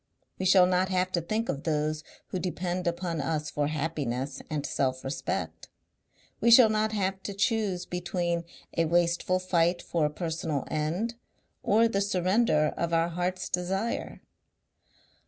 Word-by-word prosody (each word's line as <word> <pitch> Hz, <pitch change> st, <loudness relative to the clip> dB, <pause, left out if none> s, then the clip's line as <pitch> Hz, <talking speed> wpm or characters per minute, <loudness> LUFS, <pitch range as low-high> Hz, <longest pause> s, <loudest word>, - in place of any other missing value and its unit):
We 190 Hz, -, +1 dB
shall 185 Hz, -1 st, +7 dB
not 185 Hz, +1 st, +2 dB
have 185 Hz, 0 st, +1 dB
to 175 Hz, -, 0 dB
think 215 Hz, +7 st, -2 dB
of 140 Hz, -, -2 dB
those 155 Hz, 0 st, -1 dB, 0.3 s
who 185 Hz, -, -2 dB
depend 180 Hz, 0 st, -2 dB
upon 170 Hz, -2 st, -1 dB
us 150 Hz, -1 st, -2 dB
for 145 Hz, -1 st, 0 dB
happiness 145 Hz, -4 st, -3 dB
and 150 Hz, -3 st, -2 dB
selfrespect. 135 Hz, 0 st, -2 dB, 0.7 s
We 235 Hz, -, +3 dB
shall 235 Hz, -1 st, +9 dB
not 215 Hz, 0 st, +1 dB
have 190 Hz, -2 st, -1 dB
to 200 Hz, -, -6 dB
choose 200 Hz, -4 st, 0 dB
between 175 Hz, -1 st, -2 dB, 0.3 s
a 165 Hz, -, +2 dB
wasteful 175 Hz, +2 st, +2 dB
fight 175 Hz, -1 st, +1 dB
for 165 Hz, -3 st, 0 dB
a -, -, -3 dB
personal 160 Hz, -3 st, -3 dB
end 165 Hz, +10 st, -1 dB, 0.5 s
or 225 Hz, +3 st, +4 dB
the 200 Hz, -3 st, 0 dB
surrender 185 Hz, -4 st, +2 dB
of 170 Hz, 0 st, -2 dB
our 165 Hz, +1 st, +2 dB
heart's 180 Hz, +2 st, -2 dB
desire." 195 Hz, +6 st, -2 dB
175 Hz, 145 wpm, -28 LUFS, 155-190 Hz, 0.7 s, shall